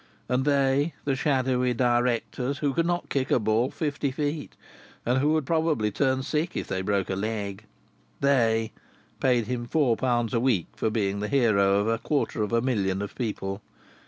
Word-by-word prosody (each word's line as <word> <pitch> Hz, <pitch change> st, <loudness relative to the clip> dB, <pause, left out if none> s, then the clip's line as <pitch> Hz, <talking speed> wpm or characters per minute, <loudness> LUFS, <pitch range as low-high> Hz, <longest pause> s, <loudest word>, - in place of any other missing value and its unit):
And 125 Hz, +1 st, 0 dB
"they" 140 Hz, +1 st, +2 dB
the 140 Hz, -2 st, +1 dB
shadowy 130 Hz, -3 st, +1 dB
directors, 120 Hz, +2 st, 0 dB
who 145 Hz, -2 st, 0 dB
could 165 Hz, +2 st, +1 dB
not 175 Hz, 0 st, -1 dB
kick 135 Hz, -1 st, -1 dB
a -, -, +4 dB
ball 110 Hz, +2 st, +1 dB
fifty 145 Hz, -2 st, -2 dB
feet 145 Hz, +2 st, -3 dB, 0.5 s
and 125 Hz, +2 st, +2 dB
who 150 Hz, +3 st, +2 dB
would 155 Hz, -3 st, +1 dB
probably 160 Hz, -9 st, +1 dB
turn 130 Hz, +4 st, +1 dB
sick 155 Hz, +5 st, -2 dB
if -, -, -2 dB
they 95 Hz, -, -2 dB
broke 100 Hz, -1 st, 0 dB
a -, -, 0 dB
leg 100 Hz, 0 st, -4 dB, 0.5 s
"they" 115 Hz, -5 st, +2 dB, 0.5 s
paid 125 Hz, -3 st, +2 dB
him 120 Hz, +1 st, -3 dB
four 135 Hz, -5 st, +2 dB
pounds 120 Hz, -2 st, 0 dB
a 115 Hz, -, +2 dB
week 115 Hz, -9 st, +2 dB
for -, -, 0 dB
being 100 Hz, -2 st, -1 dB
the 105 Hz, -, -2 dB
hero 105 Hz, -7 st, +3 dB
of 100 Hz, +1 st, +1 dB
a 115 Hz, 0 st, +1 dB
quarter 140 Hz, -6 st, -1 dB
of 105 Hz, -, -1 dB
a 115 Hz, 0 st, +2 dB
million 100 Hz, -7 st, 0 dB
of 100 Hz, -, -6 dB
people! 100 Hz, -4 st, -4 dB
125 Hz, 185 wpm, -26 LUFS, 110-140 Hz, 0.5 s, a